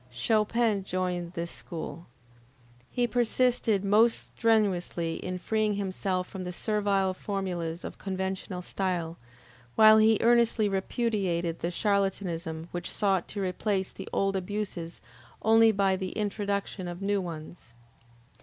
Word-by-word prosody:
Chopin 215 Hz, -, +1 dB
joined 180 Hz, -2 st, -2 dB
this 170 Hz, -1 st, -4 dB
school. 170 Hz, 0 st, -7 dB, 0.8 s
He 245 Hz, -, +1 dB
persisted 240 Hz, -3 st, +1 dB
most 220 Hz, +4 st, +3 dB
strenuously 185 Hz, -7 st, +1 dB
in 185 Hz, 0 st, -4 dB
freeing 215 Hz, +2 st, 0 dB
himself 190 Hz, -2 st, -2 dB
from 190 Hz, -2 st, -7 dB
the 180 Hz, -, -4 dB
servile 200 Hz, -1 st, 0 dB
formulas 180 Hz, -4 st, -3 dB
of -, -, -7 dB
conventional 190 Hz, -1 st, -3 dB
style, 175 Hz, -3 st, -2 dB, 0.6 s
while 215 Hz, 0 st, +8 dB
he 220 Hz, 0 st, +5 dB
earnestly 235 Hz, -2 st, +4 dB
repudiated 190 Hz, -4 st, -1 dB
the 170 Hz, -, -1 dB
charlatanism 180 Hz, -4 st, -1 dB
which 175 Hz, 0 st, -4 dB
sought 195 Hz, -4 st, +1 dB
to 200 Hz, -2 st, -4 dB
replace 190 Hz, +1 st, -1 dB
the 195 Hz, -, -9 dB
old 195 Hz, 0 st, +1 dB
abuses 190 Hz, -3 st, -4 dB, 0.4 s
only 225 Hz, +1 st, +6 dB
by 195 Hz, -2 st, +2 dB
the 185 Hz, -1 st, -4 dB
introduction 200 Hz, -2 st, -2 dB
of 175 Hz, +2 st, -6 dB
new 200 Hz, 0 st, +1 dB
ones. 160 Hz, -6 st, -8 dB
195 Hz, 125 wpm, -28 LUFS, 180-210 Hz, 0.8 s, while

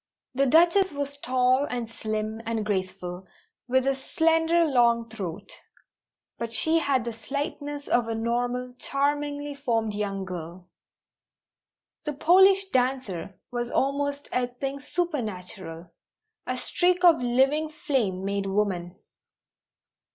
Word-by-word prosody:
The 275 Hz, +2 st, +2 dB
Duchess 340 Hz, +5 st, +4 dB
was 285 Hz, 0 st, -4 dB
tall 255 Hz, +1 st, +2 dB
and 240 Hz, -2 st, -3 dB
slim 215 Hz, 0 st, -4 dB
and 225 Hz, -2 st, -1 dB
graceful, 185 Hz, -2 st, -3 dB, 0.4 s
with 260 Hz, +1 st, +2 dB
a 275 Hz, -, +3 dB
slender, 325 Hz, +4 st, +2 dB
long 235 Hz, -5 st, +3 dB
throat; 200 Hz, -3 st, -6 dB, 0.9 s
but 235 Hz, -1 st, -3 dB
she 320 Hz, +9 st, +3 dB
had 270 Hz, -6 st, +1 dB
the 235 Hz, -, -3 dB
slightness 285 Hz, +5 st, -5 dB
of 240 Hz, -1 st, +2 dB
a 225 Hz, -, -2 dB
normal, 245 Hz, +2 st, -1 dB
charmingly 290 Hz, +1 st, -1 dB
formed 230 Hz, -6 st, -1 dB
young 200 Hz, -2 st, -3 dB
girl. 180 Hz, 0 st, -8 dB, 1.3 s
The 300 Hz, -, -2 dB
Polish 380 Hz, +6 st, +5 dB
dancer 250 Hz, -, -1 dB
was 240 Hz, -1 st, -2 dB
almost 285 Hz, +2 st, -1 dB
a 250 Hz, -1 st, +1 dB
thing 270 Hz, +3 st, -5 dB
supernatural, 190 Hz, -, -4 dB, 0.6 s
a -, -, -1 dB
streak 360 Hz, 0 st, +1 dB
of 340 Hz, -2 st, +7 dB
living 270 Hz, +6 st, +2 dB
flame 220 Hz, -11 st, -1 dB
made 200 Hz, 0 st, -1 dB
woman. 190 Hz, -3 st, -1 dB
250 Hz, 120 wpm, -26 LUFS, 210-285 Hz, 1.3 s, of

